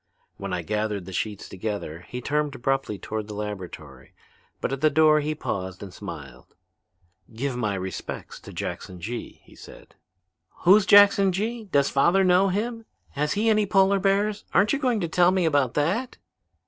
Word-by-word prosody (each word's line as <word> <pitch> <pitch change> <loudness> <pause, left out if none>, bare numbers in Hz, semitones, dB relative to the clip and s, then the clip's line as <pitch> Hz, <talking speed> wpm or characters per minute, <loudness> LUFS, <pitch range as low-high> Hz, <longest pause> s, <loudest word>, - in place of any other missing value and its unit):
When 100 -1 -6
I 90 -1 -2
gathered 105 0 -2
the 95 - -9
sheets 105 +1 -3
together 95 -4 -5
he 125 - -6
turned 150 +1 -1
abruptly 135 -4 -1
toward 110 +1 -5
the 105 - -7
laboratory, 105 -3 -8 0.4
but - - -2
at 135 - -4
the 155 - +5
door 155 +1 +5
he 150 +1 -2
paused 95 -8 -4
and 95 -3 -9
smiled. 70 -8 -10 0.8
"'Give 135 +2 -2
my 105 -5 -1
respects 95 -1 -6
to - - -12
Jackson 90 -1 -6
Gee,' 115 +7 -6
he - - -19
said." - - -14 0.7
"Who's 195 +3 +6
Jackson 200 -1 +7
Gee? 220 +4 -3
Does 140 -8 +1
father 175 +8 +3
know 185 +1 +4
him? 225 +4 -3 0.2
Has 150 +1 -1
he 210 +2 0
any 215 -2 +3
polar 195 0 +3
bears? 200 +2 +1
Aren't 205 +1 +4
you 280 - 0
going 250 -6 0
to 170 - -1
tell 175 +2 +4
me 185 -2 +1
about 145 -6 +1
that?" 190 - -1
145 Hz, 175 wpm, -25 LUFS, -, 0.8 s, Jackson